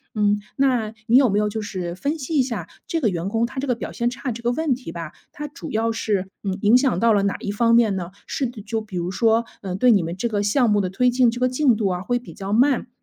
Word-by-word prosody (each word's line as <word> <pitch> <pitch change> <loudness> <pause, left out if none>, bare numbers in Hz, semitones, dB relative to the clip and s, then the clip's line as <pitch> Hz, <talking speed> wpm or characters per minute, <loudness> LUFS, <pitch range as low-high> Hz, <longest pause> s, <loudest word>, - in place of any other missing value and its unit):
嗯， 205 0 +2 0.2
那 250 -6 +2
你 240 +3 +5
有 265 -4 +5
没 200 - +1
有 210 0 +2
就 220 +1 -4
是 180 -4 -4
分 285 - -2
析 305 +3 -4
一 - - +6
下 230 -10 -3 0.2
这 330 - -1
个 230 -8 +2
员 175 +1 -3
工 230 +2 +1
他 260 +2 -6
这 280 - -3
个 250 - +1
表 - - -6
现 240 0 0
差 255 0 -4
这 235 +1 -7
个 240 +1 +1
问 305 0 0
题 245 -9 -7
吧， 165 -2 -6 0.2
它 295 0 -6
主 315 +4 -9
要 225 +1 +1
是， 205 -4 -1 0.2
呃， 195 - -1
影 210 +4 +5
响 255 -9 +1
到 230 -1 +4
了 200 - +3
哪 200 - 0
一 200 - -3
方 230 +2 +3
面 220 -4 +4
呢？ 175 -2 -4 0.2
是 265 - -2
就 220 -1 -4
比 200 -4 -7
如 175 +1 -2
说， 225 +3 +2 0.2
嗯， 190 -2 -4
对 250 +3 +5
你 200 -4 +4
们 170 +2 -4
这 235 - -1
个 205 -3 -1
项 230 +4 +2
目 205 -1 +3
的 185 - -2
推 250 +6 +2
进 250 -1 +4
这 240 +2 -4
个 255 - +3
进 255 -2 +3
度 210 -3 0
啊 180 0 -2
会 245 +4 0
比 245 - -10
较 195 +1 -6
慢？ 255 +2 +3
225 Hz, 305 characters per minute, -22 LUFS, 200-250 Hz, 0.2 s, 一